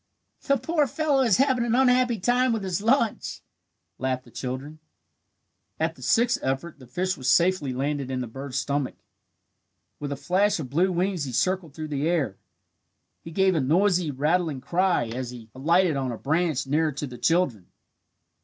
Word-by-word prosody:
"The 275 -1 +2
poor 295 +3 +1
fellow 290 +1 +1
is 230 -7 +4
having 260 -2 +2
an 235 0 +1
unhappy 250 -3 +3
time 245 +4 +2
with 220 -3 -2
his 185 0 -2
lunch," 230 0 +1 0.6
laughed 130 -1 -1
the 120 - -18
children. 135 +6 -6 1.0
At 160 +1 0
the 130 - -17
sixth 230 - +2
effort 135 +4 -3
the 130 - -14
fish 185 +7 -1
was 130 -1 -1
safely 170 -3 +3
landed 140 +1 -2
in 130 -1 -2
the 125 - -2
bird's 135 +3 -6
stomach. 140 0 -1 1.0
With 145 -1 -4
a - - -1
flash 185 +9 +1
of 130 -5 -6
blue 180 +6 +2
wings 180 -3 -1
he 130 - -5
circled 170 +4 -1
through 155 -1 -5
the 145 +2 -1
air. 140 - -1 0.8
He - - -9
gave 190 +3 +2
a 160 - +1
noisy 175 +4 +2
rattling 150 +2 0
cry 180 +5 +1
as 125 +1 -4
he 115 -3 -11
alighted 165 +5 +2
on 135 -2 -1
a 115 - -5
branch 155 0 0
nearer 155 +3 +1
to 145 +2 -4
the 125 -3 -9
children. 150 - +1
160 Hz, 175 wpm, -25 LUFS, 135-190 Hz, 1.0 s, is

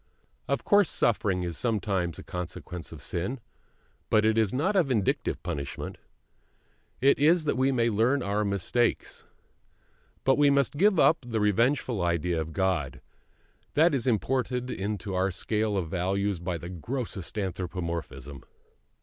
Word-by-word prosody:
Of - - -1
course 205 -4 +4
suffering 95 -5 +1
is 85 -3 -4
sometimes 100 - -1
a - - -9
consequence 90 0 -6
of - - -9
sin, 95 +10 -3 0.7
but 110 -1 +4
it 110 0 +3
is 110 -3 +2
not 160 +11 0
a 190 - +6
vindictive 125 - -1
punishment; 70 -1 -5 1.0
it 140 +2 +4
is 160 +3 +4
that 150 - 0
we 130 +2 +2
may 120 -3 +2
learn 120 +6 +2
our 100 +1 0
mistake. 100 +4 0 1.2
But 135 +1 +3
we 145 -1 +6
must 140 -1 +2
give 195 +2 +4
up 160 - +5
the 115 -1 0
revengeful 115 +2 +1
idea 85 -1 0
of 80 +1 -5
God: 85 -8 -1 0.8
that 160 +2 +5
is 130 -3 0
imported 125 +2 0
into 100 -1 -3
our 95 +1 +1
scale 105 +3 -1
of 85 -4 -2
values 95 +2 -1
by 85 0 -3
the 85 +2 -8
grossest 105 - -5
anthropomorphism. 85 - -4
105 Hz, 145 wpm, -28 LUFS, 90-130 Hz, 1.2 s, a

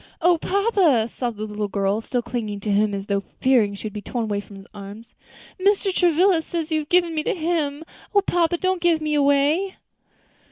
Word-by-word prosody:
"O 345 0 +3
papa!" 375 - +2
sobbed 240 -2 -4
the 215 - -4
little 210 -1 -3
girl, 200 +1 0
still 245 +1 -2
clinging 225 -4 -4
to 210 - -2
him 205 +1 +2
as 195 0 -5
though 200 -1 0 0.2
fearing 235 -6 +3
she - - -10
should 215 -2 -5
be 210 - -5
torn 235 0 -3
from 205 - -14
his 195 0 -12
arms, 205 +3 -10 0.5
"Mr. 395 0 +2
Travilla 355 0 +3
says 330 0 -4
you 315 - +2
have 300 0 -7
given 350 -2 +3
me 310 - 0
to - - -1
him. 315 -3 -1 0.3
O 405 - +6
papa! 345 -1 +1
don't 370 0 -1
give 340 -2 +3
me 305 -1 -2
away." 290 +6 +2
290 Hz, 200 wpm, -23 LUFS, 215-345 Hz, 0.5 s, O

